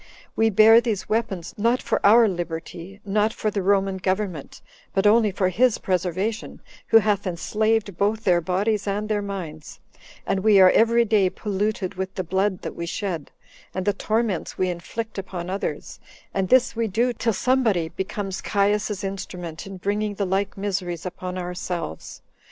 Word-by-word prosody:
We 225 Hz, 0 st, +3 dB
bear 220 Hz, +3 st, +7 dB
these 220 Hz, -6 st, -2 dB
weapons, 205 Hz, -6 st, -2 dB
not 235 Hz, +4 st, +2 dB
for 235 Hz, -, -2 dB
our 225 Hz, +3 st, +7 dB
liberty, 175 Hz, +1 st, -5 dB
not 210 Hz, +2 st, +1 dB
for 215 Hz, -, -2 dB
the 200 Hz, -, -1 dB
Roman 195 Hz, 0 st, +2 dB
government, 185 Hz, -5 st, -3 dB, 0.4 s
but 195 Hz, +1 st, +2 dB
only 215 Hz, +1 st, +5 dB
for 185 Hz, -1 st, 0 dB
his 240 Hz, +5 st, +2 dB
preservation, 185 Hz, +4 st, -2 dB, 0.3 s
who -, -, +7 dB
hath 210 Hz, -2 st, +1 dB
enslaved 210 Hz, +3 st, 0 dB
both 210 Hz, +3 st, 0 dB
their 175 Hz, -4 st, +3 dB
bodies 200 Hz, +5 st, 0 dB
and 205 Hz, +2 st, -1 dB
their 210 Hz, -1 st, 0 dB
minds; 175 Hz, -7 st, -7 dB, 0.5 s
and 195 Hz, -, 0 dB
we 205 Hz, 0 st, +5 dB
are 185 Hz, -1 st, +8 dB
every 230 Hz, +1 st, +4 dB
day 205 Hz, -4 st, +3 dB
polluted 205 Hz, -1 st, -2 dB
with 190 Hz, 0 st, -5 dB
the 185 Hz, -, -2 dB
blood 190 Hz, +2 st, -1 dB
that -, -, -4 dB
we 170 Hz, -, -5 dB
shed, 170 Hz, -4 st, -4 dB, 0.5 s
and 185 Hz, 0 st, -2 dB
the 205 Hz, -, +2 dB
torments 215 Hz, -2 st, -1 dB
we 185 Hz, -1 st, +1 dB
inflict 210 Hz, +5 st, -5 dB
upon 185 Hz, -2 st, -5 dB
others; 195 Hz, -, -4 dB, 0.3 s
and 195 Hz, -1 st, -1 dB
this 255 Hz, -2 st, +4 dB
we 230 Hz, 0 st, 0 dB
do, 235 Hz, +5 st, +1 dB
till 230 Hz, 0 st, 0 dB
somebody 215 Hz, -6 st, +1 dB
becomes 190 Hz, +2 st, -4 dB
Caius's 205 Hz, 0 st, 0 dB
instrument 180 Hz, -3 st, -6 dB
in 195 Hz, -1 st, -8 dB
bringing 205 Hz, +2 st, -2 dB
the 200 Hz, -, -1 dB
like 195 Hz, +2 st, -1 dB
miseries 185 Hz, -4 st, -3 dB
upon 180 Hz, 0 st, -5 dB
ourselves. 180 Hz, -, -5 dB
195 Hz, 165 wpm, -23 LUFS, 185-215 Hz, 0.5 s, are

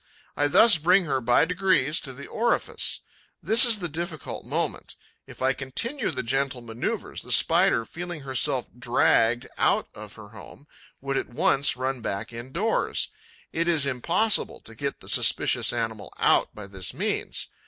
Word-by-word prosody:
I 145 Hz, -, +1 dB
thus 205 Hz, +4 st, +6 dB
bring 180 Hz, +4 st, +3 dB
her, 135 Hz, -4 st, -1 dB
by 120 Hz, +5 st, +3 dB
degrees, 180 Hz, -5 st, +1 dB
to 135 Hz, -, -6 dB
the 135 Hz, +2 st, -10 dB
orifice. 235 Hz, +2 st, -1 dB, 0.4 s
This 230 Hz, +4 st, +6 dB
is 235 Hz, -3 st, +3 dB
the 180 Hz, -3 st, -4 dB
difficult 165 Hz, 0 st, -6 dB
moment. -, -, -4 dB, 0.3 s
If -, -, -9 dB
I 135 Hz, +1 st, +3 dB
continue 185 Hz, -, -3 dB
the 130 Hz, -5 st, -4 dB
gentle 130 Hz, +1 st, -1 dB
movement, 115 Hz, 0 st, -4 dB
the -, -, -8 dB
Spider, 115 Hz, -, +4 dB
feeling 175 Hz, +1 st, -7 dB
herself 130 Hz, -1 st, 0 dB
dragged 120 Hz, -1 st, +2 dB
out -, -, +1 dB
of 105 Hz, -1 st, -11 dB
her 105 Hz, -2 st, -12 dB
home, 110 Hz, +6 st, -14 dB, 0.4 s
would 135 Hz, 0 st, -2 dB
at -, -, -3 dB
once 135 Hz, +3 st, +1 dB
run 130 Hz, 0 st, -3 dB
back 100 Hz, +1 st, -4 dB
indoors. 135 Hz, -, -2 dB, 0.4 s
It 165 Hz, +1 st, -1 dB
is 160 Hz, -5 st, +3 dB
impossible 170 Hz, -, +1 dB
to 115 Hz, -, -11 dB
get 140 Hz, +5 st, -5 dB
the -, -, -14 dB
suspicious -, -, +3 dB
animal 115 Hz, -3 st, -4 dB
out -, -, +2 dB
by 105 Hz, -, -8 dB
this 95 Hz, -2 st, -4 dB
means. -, -, -2 dB
135 Hz, 160 wpm, -25 LUFS, 120-170 Hz, 0.4 s, thus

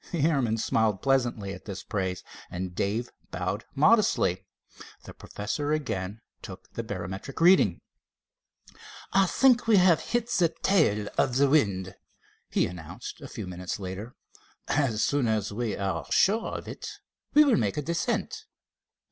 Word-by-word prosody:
The 170 Hz, -6 st, -1 dB
airman 130 Hz, -9 st, +1 dB
smiled 110 Hz, -2 st, +1 dB
pleasantly 120 Hz, -7 st, +1 dB
at -, -, -11 dB
this 100 Hz, -2 st, -6 dB
praise 95 Hz, -2 st, -3 dB, 0.3 s
and 90 Hz, 0 st, -5 dB
Dave 110 Hz, +7 st, -2 dB, 0.2 s
bowed -, -, -3 dB
modestly. -, -, +3 dB, 0.6 s
The -, -, -10 dB
professor 145 Hz, +9 st, -3 dB
again 110 Hz, -8 st, -3 dB, 0.2 s
took -, -, -11 dB
the -, -, -3 dB
barometric 95 Hz, +9 st, -6 dB
readings. 180 Hz, +3 st, +5 dB, 1.3 s
"I 195 Hz, 0 st, +4 dB
think 250 Hz, +2 st, +3 dB
we 220 Hz, -3 st, +6 dB
have 180 Hz, -3 st, +5 dB
hit 235 Hz, -1 st, -1 dB
the 175 Hz, -4 st, +3 dB
tail 105 Hz, -, +3 dB
of 125 Hz, -, +2 dB
the 140 Hz, +2 st, +4 dB
wind," 100 Hz, -11 st, +2 dB, 0.6 s
he -, -, +2 dB
announced 85 Hz, -3 st, -8 dB
a -, -, -7 dB
few -, -, -7 dB
minutes 90 Hz, +1 st, -5 dB
later. 100 Hz, +5 st, -6 dB, 0.5 s
"As 130 Hz, -7 st, +1 dB
soon 140 Hz, -4 st, +1 dB
as 105 Hz, -2 st, -1 dB
we 115 Hz, 0 st, -2 dB
are 100 Hz, -1 st, -2 dB
sure 215 Hz, +4 st, +3 dB
of -, -, -9 dB
it, -, -, -7 dB, 0.5 s
we 300 Hz, -, +9 dB
will 270 Hz, -7 st, +4 dB
make 100 Hz, -, 0 dB
a 150 Hz, -, -1 dB
descent." 230 Hz, -, -2 dB
120 Hz, 145 wpm, -27 LUFS, 100-165 Hz, 1.3 s, we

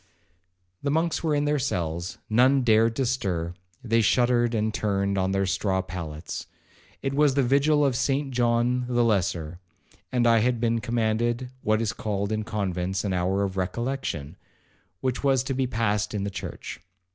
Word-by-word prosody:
The 140 Hz, -, -1 dB
monks 165 Hz, +4 st, 0 dB
were 155 Hz, -2 st, +1 dB
in 145 Hz, 0 st, +1 dB
their 145 Hz, 0 st, +1 dB
cells, 85 Hz, -3 st, -2 dB
none 130 Hz, +4 st, +4 dB
dared 115 Hz, 0 st, +4 dB
to 135 Hz, -, 0 dB
stir,—they 90 Hz, -1 st, -2 dB
shuddered, 120 Hz, +1 st, +3 dB
and 110 Hz, 0 st, 0 dB
turned 100 Hz, -2 st, 0 dB
on 95 Hz, 0 st, +1 dB
their 95 Hz, 0 st, +1 dB
straw 95 Hz, 0 st, 0 dB
pallets. 80 Hz, -3 st, -6 dB, 0.6 s
It 135 Hz, -, -1 dB
was 145 Hz, -1 st, +3 dB
the 140 Hz, -, +3 dB
vigil 145 Hz, +3 st, +3 dB
of 135 Hz, -3 st, +1 dB
Saint 135 Hz, +2 st, 0 dB
John 120 Hz, 0 st, +1 dB
the 120 Hz, -1 st, +2 dB
Lesser, 90 Hz, -6 st, 0 dB, 0.5 s
and 125 Hz, -1 st, +2 dB
I 115 Hz, -1 st, +5 dB
had 120 Hz, +1 st, +1 dB
been 115 Hz, 0 st, +1 dB
commanded 120 Hz, +2 st, 0 dB
what 110 Hz, +1 st, +1 dB
is 110 Hz, -, -1 dB
called 100 Hz, -1 st, -2 dB
in 110 Hz, 0 st, 0 dB
convents 95 Hz, -4 st, -2 dB
an 100 Hz, -3 st, -1 dB
hour 95 Hz, +2 st, +1 dB
of 95 Hz, -1 st, -3 dB
recollection, 95 Hz, -, -3 dB, 0.6 s
which 130 Hz, 0 st, -1 dB
was 135 Hz, -3 st, +3 dB
to 135 Hz, -, -2 dB
be 130 Hz, 0 st, 0 dB
passed 105 Hz, -3 st, 0 dB
in 100 Hz, -, -1 dB
the 100 Hz, -, -3 dB
church. -, -, -7 dB
115 Hz, 170 wpm, -26 LUFS, 95-125 Hz, 0.6 s, I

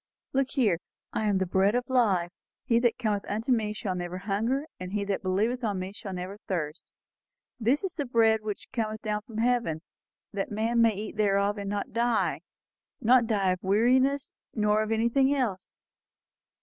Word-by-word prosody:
"Look 270 Hz, 0 st, +2 dB
here 210 Hz, -, +2 dB, 0.3 s
'I 215 Hz, -, 0 dB
am 200 Hz, -2 st, +2 dB
the 190 Hz, -, +1 dB
bread 190 Hz, +4 st, +2 dB
of 245 Hz, -1 st, 0 dB
life; 200 Hz, -9 st, +2 dB, 0.3 s
he 230 Hz, -1 st, +3 dB
that 235 Hz, -1 st, +2 dB
cometh 215 Hz, -5 st, -1 dB, 0.2 s
to -, -, +1 dB
me 220 Hz, -4 st, +2 dB
shall 200 Hz, -2 st, -3 dB
never 180 Hz, 0 st, -4 dB
hunger; 220 Hz, +9 st, -1 dB
and 185 Hz, +1 st, -6 dB
he 205 Hz, -1 st, 0 dB
that 200 Hz, -1 st, -1 dB
believeth 215 Hz, +7 st, 0 dB
on 205 Hz, -4 st, 0 dB
me 185 Hz, +1 st, -4 dB
shall 205 Hz, -2 st, -7 dB
never 185 Hz, +2 st, -5 dB
thirst... 155 Hz, -4 st, -3 dB, 0.7 s
This 250 Hz, -, +2 dB
is 380 Hz, -2 st, -2 dB
the 290 Hz, -5 st, -3 dB
bread 225 Hz, -2 st, +3 dB
which 215 Hz, -2 st, -6 dB
cometh 220 Hz, -3 st, -2 dB
down 210 Hz, -1 st, -1 dB
from 215 Hz, +1 st, -10 dB
heaven, 230 Hz, -9 st, +1 dB, 0.5 s
that 195 Hz, -1 st, -2 dB
a -, -, -7 dB
man 230 Hz, +2 st, +2 dB
may 225 Hz, -2 st, +4 dB
eat 215 Hz, +2 st, -6 dB
thereof 200 Hz, 0 st, +2 dB
and 200 Hz, -1 st, -4 dB
not 205 Hz, 0 st, -3 dB
die.' 235 Hz, 0 st, +1 dB, 0.6 s
Not 240 Hz, 0 st, +4 dB
die 200 Hz, -4 st, +2 dB
of 185 Hz, -, -2 dB
weariness, 255 Hz, +8 st, +2 dB, 0.2 s
nor 210 Hz, -1 st, +3 dB
of 215 Hz, 0 st, -2 dB
anything 235 Hz, +5 st, +3 dB
else." 220 Hz, -9 st, -2 dB
215 Hz, 185 wpm, -28 LUFS, 195-240 Hz, 0.7 s, may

